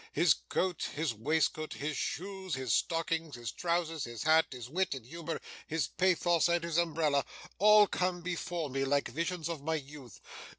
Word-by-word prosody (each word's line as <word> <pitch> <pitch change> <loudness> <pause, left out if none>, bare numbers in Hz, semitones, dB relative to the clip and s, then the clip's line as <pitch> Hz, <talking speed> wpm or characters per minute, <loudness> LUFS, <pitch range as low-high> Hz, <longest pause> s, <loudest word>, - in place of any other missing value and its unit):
His - - +5
coat, 180 -3 -2
his 155 -4 0
waistcoat, 155 +6 0
his 150 +1 -3
shoes 190 -1 -3
and 130 0 -5
stockings, 165 0 0
his 120 -3 -5
trousers, 165 -2 -1
his 120 -1 -6
hat, 160 +1 +5
his 125 -3 -7
wit 175 +2 0
and 130 -4 -9
humour, 165 +4 -5 0.3
his 160 -3 -1
pathos 175 -2 +2
and 170 0 +2
his 170 0 +1
umbrella, 155 -4 +1 0.4
all 210 +1 +8
come 180 -2 -1
before 170 -3 -3
me 135 +1 0
like 140 +1 +1
visions 165 +4 -2
of 165 -4 -4
my 160 +2 -1
youth. 140 -5 -9
160 Hz, 170 wpm, -32 LUFS, 140-175 Hz, 0.4 s, all